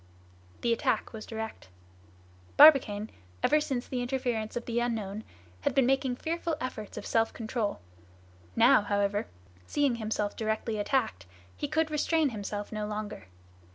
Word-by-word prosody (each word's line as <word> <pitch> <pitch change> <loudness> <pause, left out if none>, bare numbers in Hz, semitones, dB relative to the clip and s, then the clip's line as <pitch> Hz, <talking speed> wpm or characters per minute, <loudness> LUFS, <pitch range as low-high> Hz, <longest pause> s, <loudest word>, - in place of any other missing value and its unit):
The 235 - +2
attack 230 - 0
was 220 -1 -8
direct. 220 - -6 0.9
Barbicane, 245 -8 +7 0.3
ever 305 0 +4
since 260 -4 -2
the 250 -2 -2
interference 245 -4 -2
of 240 - -3
the 235 0 0
unknown, 220 -3 -2 0.4
had - - -1
been 270 - +5
making 265 -1 +1
fearful 330 +3 -2
efforts 220 -6 -5
of - - -6
self 225 0 +2
control; 220 -2 -2 0.8
now, - - +6
however, 205 0 0 0.4
seeing 280 -5 +1
himself 215 -2 -2
directly 220 0 -2
attacked, 205 - 0 0.3
he 290 - -3
could 315 +1 0
restrain 305 0 +2
himself 205 -2 -5
no 215 -1 -3
longer. 210 - -5
230 Hz, 140 wpm, -29 LUFS, 215-265 Hz, 0.9 s, Barbicane